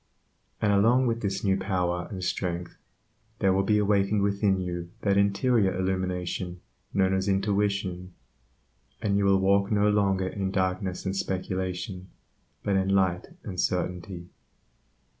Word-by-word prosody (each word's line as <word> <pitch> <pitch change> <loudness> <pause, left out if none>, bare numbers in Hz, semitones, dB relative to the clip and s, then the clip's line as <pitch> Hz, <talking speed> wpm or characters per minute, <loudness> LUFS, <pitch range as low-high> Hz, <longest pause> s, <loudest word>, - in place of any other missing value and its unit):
And 105 -1 +2
along 115 +6 +4
with 115 -1 0
this 100 -1 -2
new 95 -2 +3
power 90 -3 -1
and 95 -2 -6
strength, 90 -1 -3 0.6
there 95 -3 +3
will 95 - +3
be 105 +2 +2
awakened 100 0 +2
within 100 -1 +2
you 85 -1 -4
that 100 -1 +2
interior 100 0 +2
Illumination 90 -1 -2 0.3
known 95 -1 +2
as 95 +1 0
"intuition," 100 -2 0 0.9
and 105 -3 0
you 100 0 +2
will 100 0 +5
walk 100 +1 +2
no 105 0 +3
longer 95 -2 +2
in 95 0 -2
darkness 95 -1 -1
and 95 0 -1
speculation, 95 0 -3 0.5
but 100 -1 +1
in 95 0 +1
light 95 -2 +1 0.2
and 90 -3 -6
certainty. 90 0 -3
95 Hz, 140 wpm, -27 LUFS, 90-100 Hz, 0.9 s, will